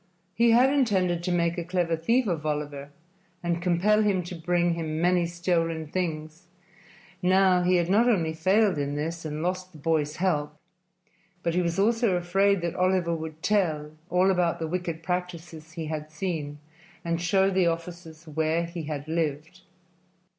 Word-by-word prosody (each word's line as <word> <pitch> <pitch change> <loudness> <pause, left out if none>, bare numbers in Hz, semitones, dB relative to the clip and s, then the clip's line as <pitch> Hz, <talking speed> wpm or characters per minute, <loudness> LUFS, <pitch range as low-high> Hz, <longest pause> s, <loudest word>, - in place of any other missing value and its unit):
He 235 +4 +3
had 250 +4 +5
intended 190 -10 +1
to 180 +1 -2
make 170 0 +1
a - - -3
clever 175 -1 0
thief 230 +11 +1
of 170 -6 -2
Oliver 145 -2 -3 0.5
and 170 0 -1
compel 185 +5 +3
him 200 -4 +1
to 175 - -8
bring 175 0 0
him 160 -2 -3
many 175 0 +2
stolen 170 -2 -1
things; 160 0 -4 0.7
now 185 0 +4
he 180 +1 +3
had 175 -1 +2
not 220 +6 +4
only 165 -8 +1
failed 190 +2 +2
in 145 0 -2
this 165 +3 -4
and 155 +1 -4
lost 185 +1 -3
the - - -12
boy's 150 -1 0
help, 150 -5 -1 0.9
but 170 - 0
he 180 - +2
was 170 -1 -1
also 225 0 +2
afraid 195 +2 +2
that 170 -1 -2
Oliver 185 -2 +1
would 160 0 -7
tell 160 -8 0 0.2
all 180 +2 +3
about 180 -2 +1
the 165 - -3
wicked 170 -1 -4
practices 170 -3 -5
he 165 -1 -5
had 155 0 -5
seen 155 -3 -4 0.5
and 170 0 -1
show 190 +3 +2
the 185 -2 +2
officers 165 -1 -5
where 160 +2 0
he 170 -1 -6
had 150 -1 -5
lived. 160 +2 -3
170 Hz, 170 wpm, -26 LUFS, 160-185 Hz, 0.9 s, had